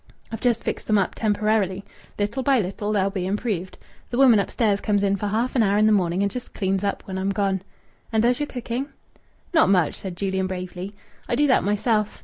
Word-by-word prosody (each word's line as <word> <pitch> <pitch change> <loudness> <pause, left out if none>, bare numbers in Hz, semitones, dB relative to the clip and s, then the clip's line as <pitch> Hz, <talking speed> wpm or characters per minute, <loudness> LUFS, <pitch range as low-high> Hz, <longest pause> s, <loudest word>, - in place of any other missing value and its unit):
I've 225 - -5
just 240 -2 +1
fixed - - -4
them 215 - +3
up 195 - +1
temporarily. 210 -3 0 0.3
Little 205 +6 -1
by 265 0 +3
little 205 +1 -2
they'll 200 -2 +1
be 185 -2 -3
improved. 195 -3 -2 0.3
The 240 - -3
woman 250 -5 +6
upstairs 200 0 0
comes 205 -2 +1
in 200 0 +2
for 205 +1 -3
half 230 +6 -1
an 245 - +4
hour 205 -1 +3
in 215 - +4
the 215 - +5
morning 185 -2 +2
and 200 - 0
just 250 +3 -7
cleans 195 -1 0
up 200 - -2
when 190 -1 -4
I'm 190 +1 -1
gone." 195 -1 0 0.5
"And 220 -1 +2
does 245 +1 +2
your 295 - -1
cooking?" 245 +1 -4 0.7
"Not 325 - +5
much!" 180 -5 +3
said 185 -3 -7
Julian 190 -1 -1
bravely. 185 +1 -6 0.3
"I - - +1
do 295 +4 +3
that 265 - +3
myself. 210 +1 0
205 Hz, 215 wpm, -23 LUFS, 190-230 Hz, 0.7 s, woman